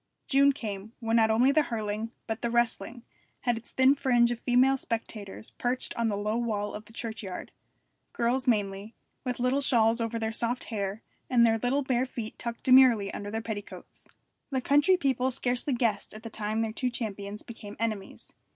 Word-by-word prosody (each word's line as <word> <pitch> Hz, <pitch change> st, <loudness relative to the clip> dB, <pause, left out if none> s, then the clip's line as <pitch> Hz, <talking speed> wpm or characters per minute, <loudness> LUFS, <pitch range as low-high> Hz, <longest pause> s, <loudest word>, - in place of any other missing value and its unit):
June 280 Hz, +1 st, +5 dB
came, 215 Hz, -5 st, -6 dB
when 225 Hz, -1 st, 0 dB
not 220 Hz, -1 st, +5 dB
only 240 Hz, +5 st, +4 dB
the 310 Hz, +2 st, +4 dB
hurling, 220 Hz, -4 st, -3 dB, 0.2 s
but 225 Hz, 0 st, -4 dB
the 235 Hz, -, 0 dB
wrestling, 235 Hz, 0 st, 0 dB, 0.4 s
had 240 Hz, -2 st, +1 dB
its 230 Hz, +1 st, -9 dB
thin 260 Hz, +1 st, +5 dB
fringe 240 Hz, -4 st, +3 dB
of 240 Hz, -, -3 dB
female 255 Hz, +2 st, +4 dB
spectators 220 Hz, -5 st, -5 dB
perched 250 Hz, +1 st, -1 dB
on 235 Hz, -1 st, 0 dB
the 205 Hz, -2 st, -1 dB
low 210 Hz, +2 st, -1 dB
wall 210 Hz, -3 st, -2 dB
of 210 Hz, +1 st, -7 dB
the 225 Hz, -, -15 dB
churchyard 220 Hz, -5 st, -6 dB, 0.6 s
girls 255 Hz, +3 st, 0 dB
mainly, 205 Hz, -1 st, 0 dB, 0.3 s
with 250 Hz, -2 st, -3 dB
little 250 Hz, +3 st, +2 dB
shawls 230 Hz, -3 st, +3 dB
over 230 Hz, 0 st, -1 dB
their 220 Hz, -1 st, -1 dB
soft 235 Hz, +2 st, -2 dB
hair, 200 Hz, +1 st, -3 dB, 0.3 s
and 240 Hz, -2 st, +5 dB
their 225 Hz, -1 st, +3 dB
little 265 Hz, +5 st, +1 dB
bare 255 Hz, -1 st, +1 dB
feet 225 Hz, -3 st, -7 dB
tucked 235 Hz, -1 st, -5 dB
demurely 255 Hz, -6 st, +6 dB
under 205 Hz, -, -5 dB
their 220 Hz, +1 st, -3 dB
petticoats. 210 Hz, -3 st, -8 dB, 0.4 s
The 265 Hz, -2 st, 0 dB
country 290 Hz, +8 st, +4 dB
people 260 Hz, -5 st, +1 dB
scarcely 250 Hz, +1 st, -1 dB
guessed 225 Hz, -4 st, -1 dB
at 215 Hz, -, -10 dB
the 225 Hz, -, -7 dB
time 215 Hz, +1 st, -1 dB
their 220 Hz, -1 st, -3 dB
two 250 Hz, +3 st, 0 dB
champions 210 Hz, -3 st, -5 dB
became 215 Hz, -3 st, -9 dB
enemies. 215 Hz, -3 st, -4 dB
230 Hz, 185 wpm, -28 LUFS, 215-250 Hz, 0.6 s, demurely